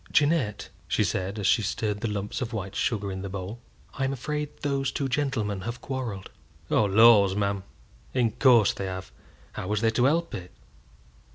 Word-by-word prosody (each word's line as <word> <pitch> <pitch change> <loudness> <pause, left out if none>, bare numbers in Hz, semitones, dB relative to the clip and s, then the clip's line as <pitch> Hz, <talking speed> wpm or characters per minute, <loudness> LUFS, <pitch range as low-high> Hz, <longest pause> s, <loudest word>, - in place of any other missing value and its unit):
"Jeannette," 145 -8 +1 0.2
she - - +2
said, 95 +3 -2
as 105 - -3
she 110 +4 +4
stirred 105 0 -2
the 115 - 0
lumps 105 +3 -3
of 120 -1 -3
white 100 -2 -4
sugar 100 -4 -1
in 95 0 -5
the 100 - -5
bowl, 95 +4 -6 0.3
"I'm 135 0 -1
afraid 150 +3 -3
those 140 -1 0
two 140 - -2
gentlemen 125 -8 -1
have 120 +4 -5
quarrelled." 120 -8 -5 0.4
"Oh, 110 - +4
laws, 100 -1 +6
ma'am, 100 -1 0 0.5
in 120 -3 +1
course 120 -3 +5
they 95 - -4
have! 95 0 -6 0.4
How - - -6
was 105 +1 0
they 115 -1 +3
to 120 +2 +2
help 165 +4 +1
it?" 90 -1 -6
110 Hz, 180 wpm, -27 LUFS, 100-130 Hz, 0.5 s, laws